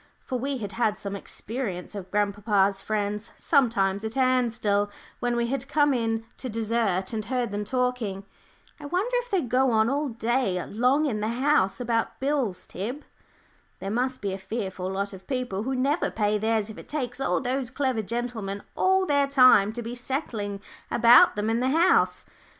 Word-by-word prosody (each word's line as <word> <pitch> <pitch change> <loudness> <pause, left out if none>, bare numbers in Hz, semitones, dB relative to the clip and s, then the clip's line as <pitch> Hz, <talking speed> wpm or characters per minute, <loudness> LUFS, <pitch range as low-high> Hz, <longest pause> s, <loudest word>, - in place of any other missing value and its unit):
For 255 -2 -2
we 275 +2 -2
had 205 -5 -5
had 215 0 0
some 200 0 -5
experience 200 -2 -5
of 195 -3 -7
grandpapa's 200 -1 +1
friends 210 +1 -2
sometimes 210 -8 +2
at 220 +4 -4
Ansdell, 235 -6 +2 0.3
when 245 0 0
we 235 0 +1
had 270 +2 -3
come 290 -1 +3
in 225 -2 -1
to 255 - -5
dessert 220 -4 -1
and 215 -1 -2
heard 245 -1 -1
them 205 0 -2
talking. 235 -4 -1 0.5
"I 290 - -7
wonder 385 +10 0
if - - -3
they 390 -5 +2
go 255 0 +2
on 220 -1 +3
all 285 +1 0
day 230 -4 0
long 255 +8 +2
in 230 -7 -1
the 210 - -1
'House' 240 -6 +2
about 230 -2 -1
bills, 265 -9 -1
Tib? 245 +10 -5 0.7
There 195 - -5
must 255 +3 -1
be 195 -2 -1
a 195 - -5
fearful 190 -2 -4
lot 200 +1 -3
of 190 0 -12
people 250 -8 -2
who 260 +4 -2
never 275 +6 +1
pay 210 -1 0
theirs 220 0 0
if - - -11
it - - -13
takes 265 -3 -3
all - - +1
those 255 -1 -2
clever 260 -3 -1
gentlemen 220 -3 -4
all 380 0 +3
their 285 -3 +2
time 255 -7 +6
to 240 +1 -5
be 230 +2 -5
settling 235 -6 -4 0.3
about 240 +1 +7
them 210 +1 -1
in 225 +1 +1
the 255 +1 +1
'House.'" 330 +6 +3
235 Hz, 180 wpm, -26 LUFS, 205-260 Hz, 0.7 s, about